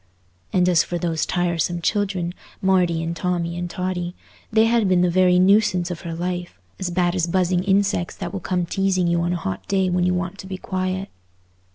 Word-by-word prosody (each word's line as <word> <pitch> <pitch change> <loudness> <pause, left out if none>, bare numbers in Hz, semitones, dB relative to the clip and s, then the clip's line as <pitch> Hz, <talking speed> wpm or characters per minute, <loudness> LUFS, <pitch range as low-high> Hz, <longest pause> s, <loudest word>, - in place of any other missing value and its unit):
And 180 -1 +3
as 175 -3 +4
for 175 - -3
those 165 -3 -1
tiresome 175 -1 0
children, 190 -2 -1 0.3
Marty 180 -4 +2
and 165 +1 -3
Tommy 170 -1 -1
and 175 0 -4
Totty, 180 -1 -3 0.4
they 220 0 +5
had 225 -3 +2
been 180 -1 +4
the 180 -1 +3
very 180 0 +4
nuisance 185 -1 +3
of 170 - -6
her 170 -2 -5
life—as 175 - -5
bad 175 0 +1
as 180 -2 0
buzzing 180 0 +1
insects 195 -3 +1
that - - -6
will 195 - -3
come 180 0 -1
teasing 190 0 +1
you 170 0 +2
on 175 +1 0
a - - -1
hot 95 - -5
day 190 -2 +1
when 180 0 +1
you 180 0 +2
want 180 +2 -3
to 190 - -8
be 190 -1 -5
quiet. 185 +1 -3
180 Hz, 200 wpm, -22 LUFS, 175-190 Hz, 0.4 s, they